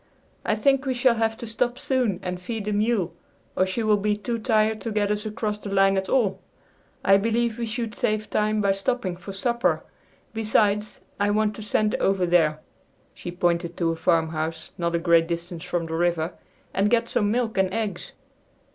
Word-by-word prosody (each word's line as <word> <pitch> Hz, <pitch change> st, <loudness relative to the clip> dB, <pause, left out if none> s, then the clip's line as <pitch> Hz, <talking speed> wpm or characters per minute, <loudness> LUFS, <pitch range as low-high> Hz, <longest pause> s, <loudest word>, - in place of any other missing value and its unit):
"I 215 Hz, -, +1 dB
think 270 Hz, +4 st, +2 dB
we 260 Hz, -, 0 dB
shall 245 Hz, 0 st, +4 dB
have 225 Hz, -1 st, 0 dB
to 235 Hz, -, -7 dB
stop 240 Hz, +2 st, -1 dB
soon 255 Hz, -9 st, 0 dB
and 180 Hz, 0 st, -4 dB
feed 220 Hz, +2 st, -4 dB
the 210 Hz, -, -1 dB
mule 210 Hz, -4 st, +1 dB, 0.4 s
or 185 Hz, -, +2 dB
she 205 Hz, +5 st, -2 dB
will 215 Hz, -1 st, +4 dB
be 210 Hz, +1 st, 0 dB
too 230 Hz, +2 st, -3 dB
tired 220 Hz, -2 st, +2 dB
to 230 Hz, -, -3 dB
get 205 Hz, -1 st, +1 dB
us 210 Hz, +1 st, -1 dB
across 210 Hz, -1 st, -3 dB
the 205 Hz, -, -7 dB
line 195 Hz, 0 st, +4 dB
at 190 Hz, 0 st, -1 dB
all. 200 Hz, -8 st, +2 dB, 0.7 s
I 195 Hz, -, +7 dB
believe 230 Hz, +2 st, 0 dB
we 235 Hz, -, -2 dB
should 225 Hz, 0 st, -3 dB
save 215 Hz, 0 st, -1 dB
time 215 Hz, 0 st, +1 dB
by 200 Hz, -1 st, +3 dB
stopping 195 Hz, -1 st, -1 dB
for 180 Hz, +2 st, -9 dB
supper. 235 Hz, +5 st, 0 dB, 0.5 s
Besides, 210 Hz, -1 st, +1 dB, 0.2 s
I 205 Hz, 0 st, +2 dB
want 210 Hz, 0 st, +1 dB
to -, -, -7 dB
send 210 Hz, 0 st, +1 dB
over 195 Hz, -2 st, +2 dB
there," 160 Hz, -3 st, +3 dB, 0.5 s
she -, -, -7 dB
pointed 175 Hz, -1 st, 0 dB
to 165 Hz, -2 st, +1 dB
a -, -, -2 dB
farmhouse 160 Hz, -1 st, 0 dB
not 170 Hz, -1 st, -1 dB
a -, -, +3 dB
great 165 Hz, -1 st, +4 dB
distance 170 Hz, 0 st, -4 dB
from 175 Hz, -1 st, -1 dB
the 160 Hz, -, -6 dB
river, 170 Hz, 0 st, 0 dB, 0.4 s
"and 200 Hz, +2 st, +2 dB
get 235 Hz, 0 st, +2 dB
some 210 Hz, -3 st, +1 dB
milk 230 Hz, 0 st, 0 dB
and 190 Hz, -1 st, +2 dB
eggs." 210 Hz, -4 st, -3 dB
210 Hz, 195 wpm, -25 LUFS, 180-225 Hz, 0.7 s, I